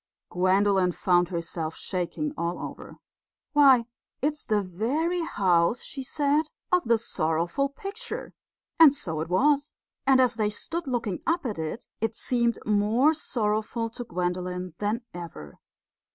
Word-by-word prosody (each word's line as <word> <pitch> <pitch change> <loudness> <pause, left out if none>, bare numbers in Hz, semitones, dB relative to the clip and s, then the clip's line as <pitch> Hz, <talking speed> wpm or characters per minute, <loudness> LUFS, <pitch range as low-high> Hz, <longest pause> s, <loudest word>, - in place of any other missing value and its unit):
Gwendolen 185 0 +3
found 175 -1 +2
herself 165 -2 -3
shaking 190 - -3
all 170 -6 -2
over. - - -8 0.6
"Why, 270 -5 +6 0.3
it's 300 +2 -1
the 210 -2 +2
very 275 - -1
house," 190 - +2
she 275 - -6
said, 290 +3 +1 0.3
"of 360 -5 +3
the 230 0 +4
sorrowful 170 - 0
picture." 400 - -7 0.5
And 305 -4 +9
so 160 - -3
it 160 - -4
was, 285 - +2 0.3
and 265 -1 +6
as 250 -2 +3
they 215 -2 +1
stood 330 +10 -5
looking 230 -7 -2
up 335 -2 +1
at 210 -8 -3
it, 160 +9 -4
it 225 0 -1
seemed 235 -1 +1
more 215 +8 +3
sorrowful 230 -5 -1
to 235 +2 -7
Gwendolen 180 -2 -3
than 210 +3 -1
ever. 165 - -9
220 Hz, 135 wpm, -27 LUFS, 180-280 Hz, 0.6 s, And